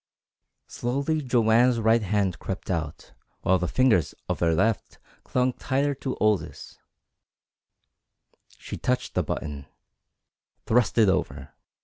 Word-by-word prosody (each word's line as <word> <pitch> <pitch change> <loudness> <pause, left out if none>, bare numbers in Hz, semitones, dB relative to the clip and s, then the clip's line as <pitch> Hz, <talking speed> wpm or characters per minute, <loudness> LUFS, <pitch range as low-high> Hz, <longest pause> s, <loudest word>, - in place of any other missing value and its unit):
Slowly 140 +6 -2
Joanne's 120 -1 +3
right 115 +1 +3
hand 100 -3 0
crept 95 0 -5
out, 80 -4 -4 0.3
while 95 0 +2
the 90 - -1
fingers 120 -8 +2
of - - -2
her 85 -1 +2
left 110 +6 0 0.3
clung 125 0 0
tighter 140 +3 -1
to 135 -1 -4
Aldous. 105 -7 -1 1.8
She - - -7
touched 125 0 -1
the - - +1
button 75 -3 -5 1.0
thrust 115 -2 +2
it 110 -2 +6
over. 75 -8 -1
110 Hz, 115 wpm, -25 LUFS, 90-125 Hz, 1.8 s, it